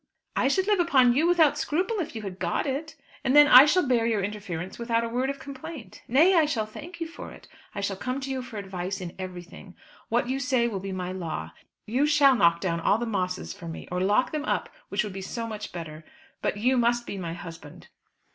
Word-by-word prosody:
"I - - +2
should 375 +8 +2
live 415 -2 +2
upon 265 -8 +4
you 305 +7 +2
without 320 -4 +4
scruple 370 +10 -1
if 320 -8 -4
you 220 - -5
had 190 -2 -7
got 175 -1 -1
it. 305 +3 -3 0.3
And 265 +1 +2
then 295 0 +9
I 260 +1 +10
shall 330 +1 +2
bear 235 -2 +2
your 215 -4 0
interference 190 -3 -5
without 230 -1 0
a - - -1
word 250 +3 -1
of 275 - -3
complaint. 275 - -9
Nay, 310 +10 +5
I 330 -4 +5
shall 235 -8 -1
thank 335 +11 -10
you 330 - -3
for 330 - -9
it. - - -14 0.3
I 200 - -3
shall 200 0 -1
come 255 +6 -3
to 270 0 -4
you 260 -1 -2
for 245 -3 -9
advice 190 -1 -4
in 180 -2 -6
everything. 180 0 -9 0.3
What 240 +1 +1
you 265 +2 -1
say 255 -3 +1
will 205 -5 -3
be 195 +1 -6
my 185 -1 -4
law. 160 - -5 0.3
You 260 +7 +1
shall 290 -2 +5
knock 170 -6 +3
down 170 -3 -1
all 200 +5 +3
the 240 - -3
Mosses 185 -5 -2
for 170 - -10
me; 165 - -7
or 180 0 -1
lock 205 +7 +2
them 305 -1 -3
up, - - -1 0.2
which - - 0
would 210 -2 -6
be 195 - -6
so 230 +4 -4
much 215 -2 -6
better. 160 -2 -8 0.4
But - - -1
you 250 +5 +2
must 240 0 +2
be 200 - -5
my 170 -2 -4
husband." 165 -4 -10
230 Hz, 235 wpm, -26 LUFS, 185-275 Hz, 0.4 s, I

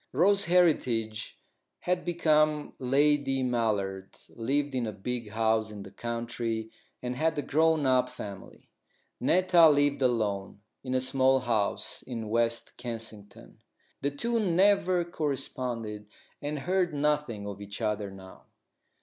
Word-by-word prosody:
Rose 195 +8 +3
Heritage 125 -11 +1 0.4
had 180 0 0
become 155 -3 +2
Lady 135 0 +2
Mallard, 105 -6 -1
lived 140 +5 -1
in 125 -3 -1
a - - -3
big 115 +2 -5
house 110 0 +1
in 105 -2 -8
the - - -11
country, 115 -1 -4 0.3
and 125 0 -3
had 160 +3 0
a 145 - -1
grown 160 0 +2
up 130 -1 +3
family. 100 -6 -9 0.5
Netta 180 -2 +5
lived 145 -1 +2
alone 105 -6 0 0.2
in 130 -1 -2
a 130 - +2
small 130 0 +3
house 110 -5 -1
in 115 -3 -6
West 115 +1 -1
Kensington. 115 -4 -7 0.4
The 140 - +1
two 230 +12 -1
never 185 -2 +3
corresponded, 125 -9 -3 0.3
and 150 +1 -3
heard 180 +2 0
nothing 145 -8 0
of 100 0 -7
each 100 0 -7
other 105 -2 -1
now. 95 -1 -13
125 Hz, 130 wpm, -29 LUFS, 110-150 Hz, 0.5 s, Netta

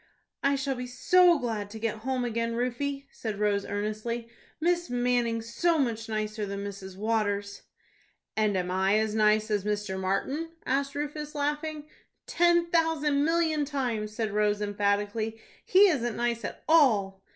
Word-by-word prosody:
"I 280 0 +2
shall 270 0 -1
be 250 -1 -5
so 350 +7 +5
glad 220 -6 -3
to 220 - -8
get 220 -1 -2
home 255 +2 -1
again, 230 0 -1
Rufie," 275 +3 -2
said 215 -3 -5
Rose, 205 -1 +1
earnestly; 215 +3 -3 0.3
"Miss 345 +1 +1
Manning's 240 -2 0
so 340 +4 +2
much 225 -5 -1
nicer 215 0 -2
than 200 0 -4
Mrs. 195 -2 -7
Waters." 205 -2 -1 0.7
"And 215 -3 +2
am 180 0 -2
I 190 +2 +2
as 220 -1 0
nice 215 0 +3
as 205 -2 +1
Mr. 210 -2 -2
Martin?" 270 - -2
asked 275 +1 0
Rufus, 295 +1 -4
laughing. 295 +1 -2 0.4
"Ten 345 -8 +3
thousand 310 -4 +2
million 325 -2 +2
times," 240 -7 -2
said 220 -2 -1
Rose, 210 0 +2
emphatically. 205 +2 -1 0.2
"He 390 +2 +6
isn't 240 -8 -1
nice 235 -1 -1
at - - -6
all." 215 -12 +4
230 Hz, 150 wpm, -28 LUFS, 210-285 Hz, 0.7 s, He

